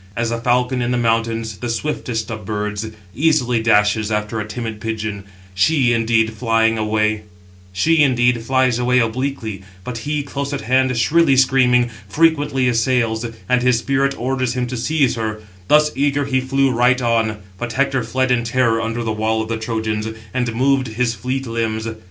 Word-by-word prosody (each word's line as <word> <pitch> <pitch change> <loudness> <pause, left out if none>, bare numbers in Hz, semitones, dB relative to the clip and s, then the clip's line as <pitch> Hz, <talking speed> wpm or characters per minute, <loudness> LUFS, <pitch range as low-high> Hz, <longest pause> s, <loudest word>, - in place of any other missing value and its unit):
As 115 0 -1
a 115 0 -3
falcon 125 +1 +1
in 120 - -1
the 125 - 0
mountains, 115 -2 -1
the 120 - -4
swiftest 115 -3 -3
of 110 -1 -6
birds, 105 +1 -3 0.3
easily 125 -4 +2
dashes 105 -1 +2
after 105 +1 -2
a 105 - -4
timid 110 -1 -5
pigeon; 110 -3 -4 0.3
she, 125 +4 +3
indeed, 115 -1 +1
flies 115 -1 +1
away 105 0 0 1.8
obliquely; 115 -3 -2 0.2
but 120 +3 -5
he, 145 +4 -2
close 140 0 -4
at 140 - -3
hand, 130 +2 +1
shrilly 145 +3 +3
screaming, 125 -2 +3 0.2
frequently 145 -5 +2
assails, 115 -2 +1 0.2
and 125 0 +2
his 125 -1 +3
spirit 135 +3 0
orders 130 -1 -1
him 125 -1 -1
to 125 +1 -5
seize 135 +2 +1
her: 110 -1 -3 0.3
thus, 150 0 +4
eager, 145 +1 +1
he 130 -1 0
flew 135 +1 +1
right 125 +2 +3
on; 115 -3 +1 0.2
but 120 -2 -4
Hector 135 0 +1
fled 130 -1 0
in 120 -1 +2
terror 115 -1 +1
under 115 +1 -3
the 110 - -2
wall 110 +1 0
of 110 - -8
the 115 - -1
Trojans, 110 -1 -2 0.3
and 120 -3 -1
moved 135 +1 +2
his 115 +1 -1
fleet 130 +3 -3
limbs. 115 -1 -2
120 Hz, 165 wpm, -19 LUFS, 110-130 Hz, 1.8 s, thus